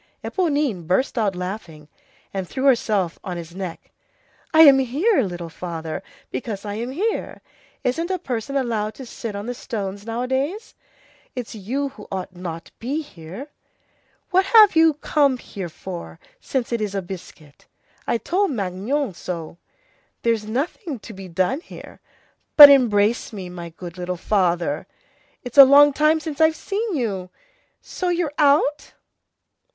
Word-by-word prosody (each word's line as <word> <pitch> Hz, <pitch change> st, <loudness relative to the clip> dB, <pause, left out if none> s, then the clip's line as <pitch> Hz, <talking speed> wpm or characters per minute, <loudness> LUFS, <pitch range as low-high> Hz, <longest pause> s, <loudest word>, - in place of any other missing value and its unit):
Éponine 285 Hz, -, -1 dB
burst 190 Hz, +10 st, +1 dB
out 210 Hz, -5 st, 0 dB
laughing, 180 Hz, -5 st, -6 dB, 0.5 s
and 190 Hz, -2 st, -4 dB
threw 265 Hz, -, -4 dB
herself 215 Hz, -9 st, +2 dB
on 180 Hz, -2 st, -5 dB
his 170 Hz, 0 st, -8 dB
neck. 185 Hz, -3 st, -7 dB, 0.6 s
"I 320 Hz, -, +6 dB
am 280 Hz, -4 st, +9 dB
here, 280 Hz, -, +2 dB
little 175 Hz, -5 st, -4 dB
father, 165 Hz, -1 st, -6 dB, 0.3 s
because 215 Hz, -5 st, -5 dB
I 205 Hz, -, -4 dB
am 230 Hz, +4 st, -4 dB
here. 395 Hz, +12 st, -3 dB, 0.4 s
Isn't 325 Hz, +8 st, -1 dB
a 375 Hz, -, 0 dB
person 260 Hz, -5 st, -4 dB
allowed 220 Hz, -5 st, -1 dB
to 265 Hz, -, -9 dB
sit 230 Hz, -2 st, -6 dB
on 200 Hz, +1 st, -5 dB
the 245 Hz, -, -3 dB
stones 205 Hz, -5 st, -5 dB
nowadays? 260 Hz, -, -2 dB, 0.6 s
It's 245 Hz, -2 st, -5 dB
you 250 Hz, +7 st, -3 dB
who 255 Hz, -6 st, -13 dB
ought 185 Hz, -1 st, -5 dB
not 170 Hz, -2 st, -6 dB
to -, -, -18 dB
be 285 Hz, +7 st, -2 dB
here. 185 Hz, -, -10 dB, 0.8 s
What 375 Hz, +1 st, +4 dB
have 425 Hz, -3 st, +7 dB
you 320 Hz, -2 st, +5 dB
come 285 Hz, -3 st, +2 dB
here 195 Hz, -7 st, -7 dB
for, 175 Hz, +2 st, -8 dB, 0.2 s
since 260 Hz, -, -3 dB
it's 215 Hz, -4 st, -2 dB
a 195 Hz, -, -2 dB
biscuit? 170 Hz, -5 st, -11 dB, 0.4 s
I -, -, +2 dB
told 385 Hz, -, 0 dB
Magnon 215 Hz, +3 st, -2 dB
so. 170 Hz, -1 st, -6 dB, 0.6 s
There's 225 Hz, -2 st, +1 dB
nothing 285 Hz, -, -3 dB
to 220 Hz, +1 st, -11 dB
be 190 Hz, -1 st, -9 dB
done 185 Hz, -, 0 dB
here. -, -, -12 dB, 0.6 s
But 290 Hz, -2 st, +13 dB
embrace 230 Hz, -4 st, +3 dB
me, 190 Hz, -4 st, -7 dB
my 175 Hz, -1 st, -7 dB
good 175 Hz, +1 st, -10 dB
little 180 Hz, 0 st, -3 dB
father! 175 Hz, -6 st, 0 dB, 0.6 s
It's 245 Hz, +2 st, 0 dB
a -, -, +15 dB
long 285 Hz, +2 st, +7 dB
time 305 Hz, +2 st, +3 dB
since 310 Hz, -1 st, -5 dB
I've 315 Hz, 0 st, +5 dB
seen 410 Hz, +1 st, -3 dB
you! 200 Hz, -9 st, -2 dB, 0.5 s
So 365 Hz, -, -3 dB
you're 345 Hz, -4 st, -1 dB
out?" 295 Hz, 0 st, +3 dB
230 Hz, 150 wpm, -22 LUFS, 185-285 Hz, 0.8 s, a